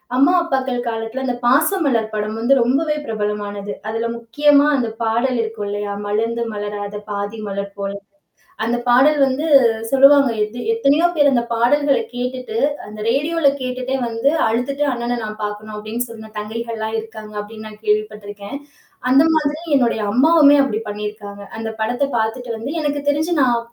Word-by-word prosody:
அம்மா, 275 +7 +5
அப்பாக்கள் 265 -5 -1
காலத்தில 225 +3 -3
அந்த 250 -1 -1
"பாசமலர்" 275 - +2
படம் 215 0 -2
வந்து 240 +4 +3
ரொம்பவே 285 +6 +1
பிரபலமானது. 205 -2 -3
அதில 225 +1 -2
முக்கியமா, 285 +5 +3
அந்த 245 -3 0 0.2
பாடல் 235 +3 +1
இருக்கும் 220 -2 -4
இல்லயா! 205 0 -3
மலர்ந்து 225 +3 -1
மலராத 205 0 -5 0.2
பாதி 205 +2 -4
மலர் 200 0 -5
போல 200 0 -2 0.7
அந்த 235 +2 0
பாடல் 270 +5 +5
வந்து 270 +4 -1 0.4
சொல்லுவாங்க. 275 +1 +6
எத் 215 +2 -6 0.2
எத்தனையோ 330 -7 +3
பேரு 290 -2 +4
அந்த 240 -3 +2
பாடல்கள 280 +5 +3 0.2
கேட்டுட்டு, 250 -1 -4 0.3
அந்த 215 +1 -10
ரேடியோல 295 +5 +2
கேட்டுட்டே 255 +1 -3
வந்து 230 +3 0 0.2
அழுத்துட்டு 250 +6 -1
அண்ணன 240 0 -2
நான் 215 0 -6
பாக்கணும் 210 +1 -5
அப்பிடின்னு 220 +4 -4
சொன்ன 220 -1 -10
தங்கைகள்லாம் 220 +1 -4
இருக்காங்க, 220 -1 -10
அப்பிடின்னு, 215 +1 -10
நான் 215 0 -13
கேள்விப்பட்டிருக்கிறேன். 210 +1 -2 0.5
அந்த 270 +3 +6
மாதிரி 300 0 0 0.2
என்னுடைய 240 -4 +1
அம்மாவுமே, 290 +3 +6
அப்பிடி 220 -6 -1
பண்ணியிருக்காங்க. 210 -1 -6 0.2
அந்த 225 0 -4
படத்த 245 +5 0
பாத்துட்டு 230 +2 -2
வந்து 235 +6 -5
எனக்கு 290 -1 -1
தெரிச்சு 315 +4 0
நான் 245 -2 +3
235 Hz, 145 wpm, -19 LUFS, 215-270 Hz, 0.7 s, சொல்லுவாங்க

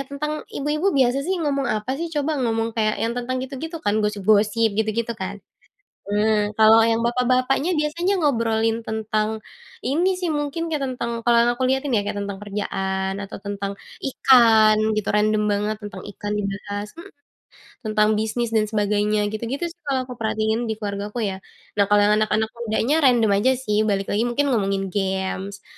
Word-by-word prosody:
tentang 300 +2 -3 0.2
ibu-ibu 305 +4 -1
biasa 260 0 +3
sih 375 +6 -1
ngomong 280 -2 0
apa 215 +4 -1
sih 335 - -2
coba 300 -2 -1
ngomong 225 -2 0
kayak 215 -1 0
yang 230 - -1
tentang 245 +1 -3
gitu-gitu 295 +6 -6
kan 210 +1 +2
gosip-gosip 210 +2 +2
gitu-gitu 220 +2 -1
kan, 200 -2 -5 0.7
nah 210 0 +2
kalau 220 +1 +7
yang 225 0 +1
bapak-bapaknya 255 +6 +1
biasanya 345 +6 0
ngobrolin 230 -6 +1
tentang, 220 0 -2 0.5
ini 335 +8 +2
sih 365 - -2
mungkin 295 +3 -2
kayak 305 -3 -2
tentang 235 -2 -4
kalau 235 0 +4
yang 235 +1 +4
aku 250 - -5
lihatin 265 0 0
ya 210 - +2
kayak 205 0 -4
tentang 200 -1 -4
kerjaan 195 -2 -2
atau 195 - -7
tentang, 200 0 -4 0.3
ikan 230 -5 +5 0.2
gitu 210 - -3
random 210 0 +2
banget 210 +1 -1
tentang 205 -1 -8
ikan 205 +1 -5
dibahas, 205 0 -4
mhm, 380 +4 -10 0.8
tentang 215 0 +3
bisnis 220 +2 -2
dan 220 -1 +2
sebagainya 210 0 +1
gitu-gitu 235 +7 -4
sih 345 - -20
kalau 265 -2 0
aku 250 0 -8
perhatiin 220 +1 -1
di 220 - -2
keluargaku 210 +2 -4
ya, 195 -2 -2 0.4
nah 200 - +4
kalau 205 0 +4
yang 205 +1 +4
anak-anak 215 0 +1
mudanya 235 +5 0
random 240 -7 +4
aja 260 +5 +3
sih 245 -5 -2
balik 195 -2 -1
lagi 220 +4 +1
mungkin 265 +4 0
ngomongin 195 -4 0
games, 190 0 -3
220 Hz, 170 wpm, -22 LUFS, 210-255 Hz, 0.8 s, kalau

